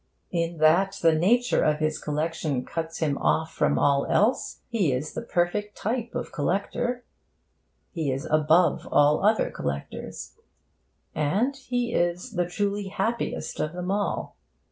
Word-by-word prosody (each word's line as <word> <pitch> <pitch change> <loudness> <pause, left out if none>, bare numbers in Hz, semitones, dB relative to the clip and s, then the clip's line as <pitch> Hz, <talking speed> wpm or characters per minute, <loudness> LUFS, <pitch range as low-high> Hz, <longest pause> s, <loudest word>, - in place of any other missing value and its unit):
In 170 -1 -1
that 180 +6 +4
the 165 -1 +6
nature 230 +10 +3
of 150 -1 +2
his 155 0 -1
collection 150 -3 -2
cuts 165 0 -4
him 145 -4 0
off 160 0 +1
from - - +1
all 140 -1 +2
else, 220 +5 +1
he 205 - +1
is 130 +4 -2
the - - -4
perfect 205 0 -1
type 235 +1 -3
of - - -2
the - - -19
collector. 245 0 -1 0.9
He 160 -6 -1
is 135 +1 -3
above 155 +3 +3
all 145 +3 +4
other 215 +2 +3
collectors. 70 0 -5 0.8
And 200 - +1
he 245 -3 -2
is 175 +7 0
the 175 -4 0
truly 200 +2 -1
happiest 220 +5 -2
of 155 - -1
them 180 +1 -3
all. 205 0 -2
175 Hz, 145 wpm, -26 LUFS, 155-210 Hz, 0.9 s, the